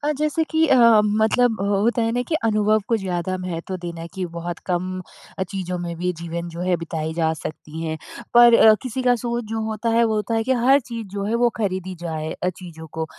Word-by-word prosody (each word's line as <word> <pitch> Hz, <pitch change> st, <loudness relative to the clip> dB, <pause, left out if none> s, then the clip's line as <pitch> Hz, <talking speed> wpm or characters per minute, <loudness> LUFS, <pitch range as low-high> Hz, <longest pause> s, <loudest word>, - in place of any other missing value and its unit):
अ, 300 Hz, +1 st, 0 dB
जैसे 305 Hz, +2 st, +1 dB
कि 320 Hz, 0 st, +3 dB
अ 270 Hz, -, +4 dB
अ, 225 Hz, -2 st, +7 dB
मतलब 220 Hz, +3 st, +2 dB
अ -, -, 0 dB
अ, -, -, 0 dB
होता 205 Hz, +4 st, +1 dB
है 225 Hz, 0 st, 0 dB
ना 245 Hz, -, 0 dB
कि 330 Hz, -, -1 dB
अनुभव 215 Hz, -1 st, +3 dB
को 230 Hz, -, +3 dB
ज़्यादा 185 Hz, -2 st, -2 dB
महत्व 180 Hz, 0 st, -4 dB
देना 170 Hz, -1 st, -6 dB
है 165 Hz, -, -7 dB
कि 190 Hz, -2 st, -3 dB
बहुत 170 Hz, 0 st, -4 dB
कम 185 Hz, +1 st, -2 dB, 0.4 s
अ, -, -, 0 dB
चीज़ों 185 Hz, -1 st, -4 dB
में 175 Hz, -1 st, -4 dB
भी 180 Hz, +2 st, -1 dB
जीवन 170 Hz, 0 st, -4 dB
जो 170 Hz, 0 st, -8 dB
है 180 Hz, 0 st, +1 dB
बिताई 160 Hz, -1 st, -4 dB
जा 160 Hz, -1 st, +1 dB
सकती 155 Hz, +1 st, -7 dB
हैं 160 Hz, -1 st, -3 dB, 0.4 s
पर 240 Hz, 0 st, +8 dB
अ, 220 Hz, -1 st, +7 dB
किसी 260 Hz, 0 st, -3 dB
का 250 Hz, -1 st, +4 dB
सोच 240 Hz, 0 st, -3 dB
जो 225 Hz, 0 st, -2 dB
होता 220 Hz, +1 st, -2 dB
है 230 Hz, +1 st, +4 dB
वो 220 Hz, -1 st, +1 dB
होता 215 Hz, +2 st, -1 dB
है 225 Hz, -, +1 dB
कि 260 Hz, -, +1 dB
हर 260 Hz, +3 st, +4 dB
चीज़ 230 Hz, -3 st, -7 dB
जो 200 Hz, -1 st, -2 dB
है 215 Hz, -, -1 dB
वो 240 Hz, -, +6 dB
ख़रीदी 185 Hz, -3 st, -2 dB
जाए 160 Hz, -2 st, -4 dB
अ, 180 Hz, -, -2 dB
चीज़ों 170 Hz, -3 st, -8 dB
को, 160 Hz, -, -2 dB
200 Hz, 245 wpm, -22 LUFS, 175-230 Hz, 0.4 s, पर